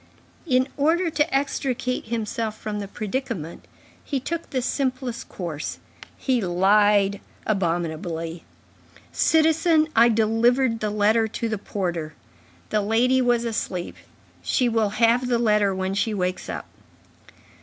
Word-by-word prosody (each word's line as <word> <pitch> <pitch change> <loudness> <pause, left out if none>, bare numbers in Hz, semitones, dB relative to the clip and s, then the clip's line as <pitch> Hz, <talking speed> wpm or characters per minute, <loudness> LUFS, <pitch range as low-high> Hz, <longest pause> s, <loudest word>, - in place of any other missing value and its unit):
In 255 -2 +3
order 330 +4 +2
to 300 +2 +1
extricate 265 -2 -1
himself 225 -1 -3
from 210 -1 -4
the 200 - -5
predicament, 210 - -4 0.4
he 280 - -2
took 335 +6 -4
the 260 - -1
simplest 255 -3 -2
course; 165 -5 -5 0.4
he 255 -3 0
lied 200 +2 +3 0.2
abominably. 165 -3 -2 0.7
"Citizen, 320 0 +3
I 235 +1 +6
delivered 230 +2 +2
the 215 - -1
letter 215 +2 +2
to 230 +1 -3
the 215 -2 -2
porter. 175 -6 -3 0.6
The 215 - +2
lady 240 +5 +2
was 240 -1 +2
asleep. 185 -6 -3 0.5
She 250 - +1
will 225 -3 +1
have 230 +4 +2
the 245 -1 +2
letter 210 -3 +3
when 190 0 -2
she 210 +2 0
wakes 185 -1 -2
up." - - -5
225 Hz, 125 wpm, -24 LUFS, 200-255 Hz, 0.7 s, I